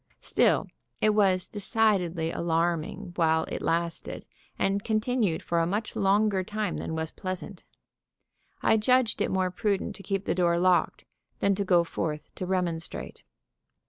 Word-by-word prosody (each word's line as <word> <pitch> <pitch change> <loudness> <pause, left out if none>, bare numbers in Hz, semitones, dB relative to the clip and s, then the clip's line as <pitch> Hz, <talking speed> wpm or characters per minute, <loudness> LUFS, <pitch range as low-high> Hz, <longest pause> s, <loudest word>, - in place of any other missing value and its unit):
Still - - +2 0.3
it 215 - +4
was 195 -3 +2
decidedly 190 -6 0
alarming 170 +1 -1
while 160 -1 +3
it - - -5
lasted, 170 0 -2 0.3
and 200 +1 0
continued 220 -5 0
for 170 - 0
a 165 - +2
much 210 +5 -2
longer 200 0 +2
time 210 0 -3
than 160 - -4
was 160 0 -3
pleasant. 185 0 -6 1.0
I 220 - +4
judged 250 +1 +2
it - - +1
more 185 -1 0
prudent 200 +1 -1
to - - -11
keep 195 0 -2
the - - +1
door 175 -1 +2
locked 180 0 +2 0.3
than 200 - +2
to 200 +1 -1
go 180 -3 +4
forth 150 -2 -4
to 185 - -5
remonstrate. 170 - -3
185 Hz, 145 wpm, -27 LUFS, 170-205 Hz, 1.0 s, it